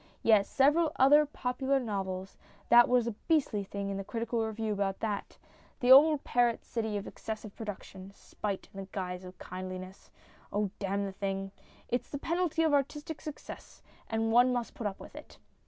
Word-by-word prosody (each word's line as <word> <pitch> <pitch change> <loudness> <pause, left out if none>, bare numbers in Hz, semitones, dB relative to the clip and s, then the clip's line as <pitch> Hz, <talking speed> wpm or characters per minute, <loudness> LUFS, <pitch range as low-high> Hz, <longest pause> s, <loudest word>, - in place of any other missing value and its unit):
Yes, 215 -3 +4
several 295 +4 +3
other 290 +3 +6
popular 265 0 -1
novels. 195 -5 -4 0.3
That 240 0 +7
was 245 -2 +3
a 235 - -1 0.2
beastly 285 -11 +2
thing 200 0 -4
in 195 - -3
the 195 - -4
Critical 230 +2 -2
Review 220 -1 -2
about 195 -1 -1
that. 210 -3 -3 0.4
The 250 0 +3
old 295 +2 +8
parrot 240 -1 +1
cry 230 -2 0
of 205 0 -3
excessive 215 -2 -7
production 195 -3 -8
spite 200 -2 -5
in 195 - -8
the 195 - -6
guise 180 -1 -4
of 185 0 -11
kindliness. 185 +1 -8 0.4
Oh, 205 -1 0
damn 200 0 -1
the 195 - -4
thing! 195 0 -3 0.4
It's 245 - -2
the 285 - -4
penalty 330 +1 0
of 315 -2 +2
artistic 295 +2 -1
success, 305 -2 -9 0.3
and 225 0 0
one 245 +2 +5
must 245 -2 -2
put 225 - -3
up 195 - -6
with - - -11
it. - - -12
220 Hz, 175 wpm, -31 LUFS, 195-265 Hz, 0.4 s, old